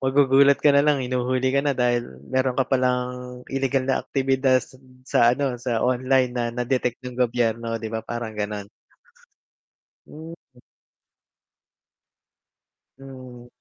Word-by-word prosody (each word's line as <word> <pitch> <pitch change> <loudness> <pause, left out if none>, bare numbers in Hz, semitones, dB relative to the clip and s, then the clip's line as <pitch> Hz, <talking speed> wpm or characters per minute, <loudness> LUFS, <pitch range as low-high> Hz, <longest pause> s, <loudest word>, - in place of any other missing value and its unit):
magugulat 135 +1 +4
ka 145 - +5
na 140 - +5
lang 145 -4 +2
hinuhuli 130 +1 -1
ka 140 - +3
na, 145 - +2
dahil 120 -1 +1 0.2
meron 130 -1 0
ka 135 - +2
palang, 125 -1 -2
ilegal 135 0 0
na 135 - +1
aktibidad 130 -1 +1
s - - -18
hmm, 130 -1 -23
sa 120 -2 +3
ano, 135 -3 -1
sa 120 -2 -1
online 130 0 +1
na 120 -1 -2
na-detect 125 0 -2
ng 125 0 -6
gobyerno, 115 -1 0
'di 110 - -5
ba, 110 - -2
parang 120 -2 -5
ganon. 105 -1 -4 1.4
Hmm. 160 +2 -10 2.6
Hmm. 130 -2 -12
130 Hz, 130 wpm, -23 LUFS, 120-135 Hz, 2.6 s, ka